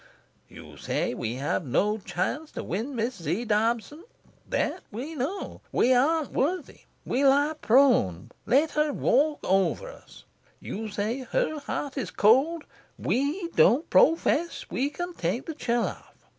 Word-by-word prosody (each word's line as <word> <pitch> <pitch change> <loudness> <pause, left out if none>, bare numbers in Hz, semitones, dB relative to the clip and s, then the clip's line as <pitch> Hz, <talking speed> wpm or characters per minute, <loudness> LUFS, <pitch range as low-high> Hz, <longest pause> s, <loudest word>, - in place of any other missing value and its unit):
You - - -13
say - - -2
we 115 +1 -3
have 140 +6 -1
no 205 - +1
chance 215 - -3
to - - -5
win 225 - -4
Miss 230 -3 -2
Z. 170 +10 -2
Dobson. 230 - 0 0.5
That - - -1
we 255 +9 -6
know. 315 +8 -4
We 255 - +3
aren't 295 +4 +2
worthy. 320 +4 -2 0.2
We 265 - 0
lie 285 +3 +4
prone. 230 - +3 0.2
Let 290 +5 +3
her 300 0 +1
walk 295 +3 +2
over 195 - +1
us. - - -16 0.4
You 220 +1 -5
say 210 +5 -2
her 315 - -1
heart 285 0 -4
is 210 -9 -3
cold. 275 - +3 0.3
We 300 +7 -1
don't 295 -2 +4
pro 325 - +6
fess 330 +1 -1
we 275 +3 0
can 350 +4 -5
take 195 - -2
the 325 - -5
chill 240 -5 0
off. - - -8
265 Hz, 150 wpm, -27 LUFS, 215-305 Hz, 0.5 s, pro